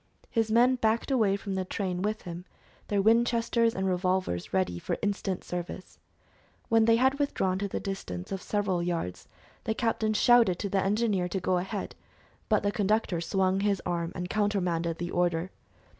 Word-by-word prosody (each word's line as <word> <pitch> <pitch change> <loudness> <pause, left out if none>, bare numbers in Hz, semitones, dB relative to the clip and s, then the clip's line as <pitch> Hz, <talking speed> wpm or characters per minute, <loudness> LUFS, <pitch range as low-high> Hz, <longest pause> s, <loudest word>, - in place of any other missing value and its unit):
His 225 -2 +1
men 245 +3 +4
backed 225 +3 0
away 215 -7 +3
from 200 -1 -5
the 190 0 -1
train 185 -1 -3
with 215 +2 -2
him, 175 +1 -7 0.4
their 200 -1 +1
Winchesters 230 +1 +3
and 190 - -1
revolvers 180 - -1
ready 185 - 0
for - - -3
instant 200 -2 -1
service. 180 +1 -6 0.7
When 225 -1 +4
they 230 0 +5
had 265 +4 +2
withdrawn 190 -10 0
to 200 - -1
the - - -3
distance 90 - -5
of 195 - -3
several 200 -4 -1
yards, 170 - -3 0.4
the 220 - 0
captain 220 -2 0
shouted 235 -6 +5
to 200 - -3
the 195 0 +1
engineer 200 -2 +1
to 190 +2 -2
go 180 0 +1
ahead, 195 +2 -4 0.6
but 215 -3 +3
the 205 - +1
conductor 205 -4 0
swung 190 +2 +1
his 200 -1 +1
arm 170 -1 -2
and 180 0 -3
countermanded 180 -6 0
the 175 0 -4
order. 175 0 0
195 Hz, 175 wpm, -28 LUFS, 180-220 Hz, 0.7 s, they